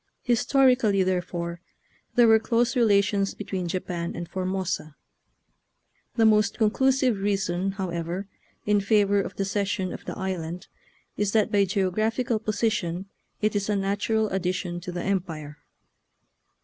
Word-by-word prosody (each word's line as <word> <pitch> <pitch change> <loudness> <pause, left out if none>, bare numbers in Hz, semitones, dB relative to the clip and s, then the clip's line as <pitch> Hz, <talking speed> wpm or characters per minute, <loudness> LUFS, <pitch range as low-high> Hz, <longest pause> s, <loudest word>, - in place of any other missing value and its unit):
Historically, 245 -4 +3
therefore, 175 -2 -2 0.5
there 240 -2 +6
were 220 0 +6
close 235 +3 +1
relations 200 -4 +2
between 190 -3 -4
Japan 170 -1 -3
and 170 0 -5
Formosa. 185 -4 -3 1.2
The 225 - +4
most 215 -1 +3
conclusive 255 +1 +2
reason, 195 -2 0
however, 180 0 -4 0.4
in 205 -1 +3
favor 200 0 +3
of 185 - -6
the 195 - -1
cession 195 -1 -1
of - - -8
the - - -5
island 180 -2 -4 0.5
is 205 -1 0
that 220 -1 +2
by 200 -2 +4
geographical 215 +5 0
position 200 -4 -1 0.3
it 215 0 +1
is 200 0 -1
a 210 - +2
natural 205 +3 0
addition 180 -2 -2
to 180 +1 -7
the 175 0 -4
Empire. 165 -6 -3
195 Hz, 130 wpm, -26 LUFS, 180-215 Hz, 1.2 s, there